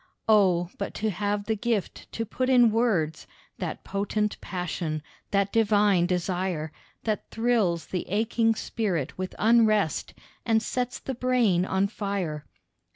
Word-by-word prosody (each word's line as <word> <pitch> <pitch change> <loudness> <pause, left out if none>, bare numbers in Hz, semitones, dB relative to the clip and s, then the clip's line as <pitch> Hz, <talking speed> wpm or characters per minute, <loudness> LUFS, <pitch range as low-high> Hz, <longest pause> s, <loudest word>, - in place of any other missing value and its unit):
Oh! 185 -5 +4
but 200 - -4
to 220 0 -1
have 205 +2 -1
the 220 - 0
gift 220 -2 -2
to 225 - -2
put 255 +4 -2
in 245 -3 +6
words, 210 -9 0 0.3
That - - -4
potent 210 +1 -2
passion, 170 -4 -3 0.3
that 200 0 +1
divine 205 -5 +3
desire, 180 -3 -1 0.3
That 215 -2 -2
thrills 225 -8 +1
the 180 - -4
aching 225 +3 +2
spirit 185 - -2
with 185 0 -4
unrest 215 -6 +3 0.3
And 225 -1 +2
sets 250 +2 -2
the 265 - -5
brain 240 -8 +2
on 190 +1 +2
fire. 195 -8 -3
205 Hz, 135 wpm, -26 LUFS, 180-225 Hz, 0.3 s, in